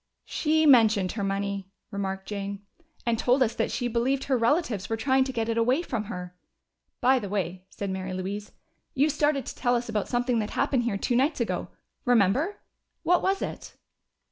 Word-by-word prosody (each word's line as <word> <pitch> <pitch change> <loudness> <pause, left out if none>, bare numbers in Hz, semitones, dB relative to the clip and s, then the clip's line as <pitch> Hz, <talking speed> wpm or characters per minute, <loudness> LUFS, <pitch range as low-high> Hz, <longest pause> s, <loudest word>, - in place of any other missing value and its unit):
"She 315 0 +1
mentioned 220 -9 +5
her 205 - -3
money," 195 0 -2 0.2
remarked 195 -1 -3
Jane, 200 0 -5 0.4
"and 230 -2 +1
told 255 +2 +4
us 235 - 0
that - - -1
she 245 - -1
believed 245 +3 0
her 270 - +1
relatives 235 - +1
were 225 - 0
trying 265 +3 +3
to 265 - -3
get 225 -3 -2
it 230 0 0
away 255 +8 +2
from 230 -9 -3
her." 180 -4 -7 0.7
"By 260 +1 +5
the 205 -4 -6
way," 185 -2 -3
said 200 0 -4
Mary 190 0 -4
Louise, 195 +3 -4 0.4
"you 290 +3 +3
started 295 -3 +1
to - - -5
tell 245 -1 +1
us 240 0 -2
about 215 -2 -1
something 245 -1 +1
that 210 -1 -2
happened 270 -4 +1
here 215 -4 0
two 240 - 0
nights 275 +5 +2
ago. 235 - -1 0.4
Remember? 245 - +2 0.4
What 355 0 +3
was 385 +1 +1
it?" - - -6
230 Hz, 190 wpm, -27 LUFS, 200-265 Hz, 0.7 s, mentioned